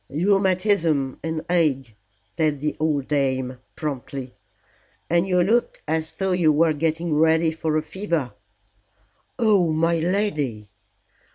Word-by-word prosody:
"Rheumatism 185 Hz, -4 st, +1 dB
and 160 Hz, -1 st, -3 dB
ague," 145 Hz, -9 st, +1 dB, 0.4 s
said 155 Hz, -4 st, 0 dB
the 150 Hz, +2 st, -2 dB
old 150 Hz, -3 st, 0 dB
dame 130 Hz, -3 st, -1 dB, 0.2 s
promptly. 135 Hz, -3 st, -5 dB, 0.8 s
"And 170 Hz, +2 st, +2 dB
you 180 Hz, -1 st, +3 dB
look 230 Hz, +6 st, +1 dB
as 160 Hz, +1 st, -2 dB
though 190 Hz, -1 st, -1 dB
you 175 Hz, -4 st, +3 dB
were 155 Hz, +1 st, +3 dB
getting 160 Hz, +2 st, -1 dB
ready 160 Hz, +1 st, +3 dB
for 160 Hz, -1 st, -1 dB
a 155 Hz, -, -1 dB
fever." 165 Hz, -, -3 dB, 1.0 s
"Oh, 205 Hz, -8 st, +3 dB
my 165 Hz, +1 st, +1 dB
lady!" 155 Hz, -, -1 dB
160 Hz, 120 wpm, -23 LUFS, 145-175 Hz, 1.0 s, you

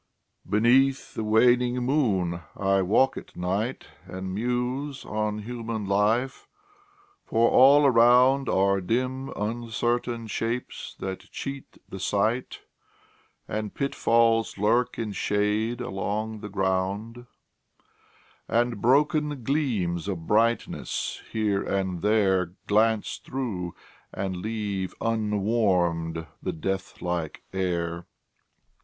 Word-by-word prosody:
Beneath 130 Hz, +6 st, +3 dB
the 110 Hz, -, -3 dB
waning 120 Hz, +3 st, +4 dB
moon 110 Hz, -, 0 dB, 0.2 s
I 95 Hz, 0 st, +2 dB
walk 115 Hz, +8 st, +3 dB
at -, -, -10 dB
night, 100 Hz, +8 st, -2 dB, 0.2 s
And 95 Hz, 0 st, -5 dB
muse 125 Hz, +5 st, -2 dB
on 105 Hz, 0 st, -2 dB
human 115 Hz, -2 st, -4 dB
life 110 Hz, +7 st, +1 dB, 0.8 s
for 115 Hz, +1 st, +2 dB
all 140 Hz, +3 st, +7 dB
around 125 Hz, +2 st, +5 dB
Are 100 Hz, 0 st, +2 dB
dim 130 Hz, +6 st, -1 dB
uncertain 120 Hz, +2 st, -2 dB
shapes 115 Hz, +3 st, -4 dB
that 95 Hz, -1 st, -6 dB
cheat 135 Hz, -1 st, -7 dB
the 95 Hz, -, -8 dB
sight, 110 Hz, +6 st, -1 dB, 0.9 s
And 105 Hz, +1 st, -4 dB
pitfalls 115 Hz, -5 st, +2 dB
lurk 115 Hz, +5 st, +1 dB
in 110 Hz, -2 st, -3 dB
shade 105 Hz, +4 st, 0 dB
along 110 Hz, 0 st, -3 dB
the 105 Hz, 0 st, -7 dB
ground, 100 Hz, +5 st, -2 dB, 1.2 s
And 120 Hz, -2 st, 0 dB
broken 145 Hz, +1 st, +2 dB
gleams 110 Hz, -, -1 dB
of 85 Hz, -5 st, -4 dB
brightness, 115 Hz, +4 st, 0 dB
here 105 Hz, -3 st, 0 dB
and 95 Hz, -3 st, -2 dB
there, 95 Hz, -4 st, +2 dB
Glance 110 Hz, +1 st, +1 dB
through, 105 Hz, -10 st, -4 dB, 0.4 s
and 95 Hz, -1 st, -3 dB
leave 100 Hz, -2 st, -3 dB
unwarmed 100 Hz, -7 st, 0 dB, 0.2 s
the -, -, -3 dB
death 95 Hz, +4 st, -4 dB
like 85 Hz, -3 st, -3 dB
air. 85 Hz, -2 st, -2 dB
110 Hz, 100 wpm, -26 LUFS, 95-120 Hz, 1.2 s, all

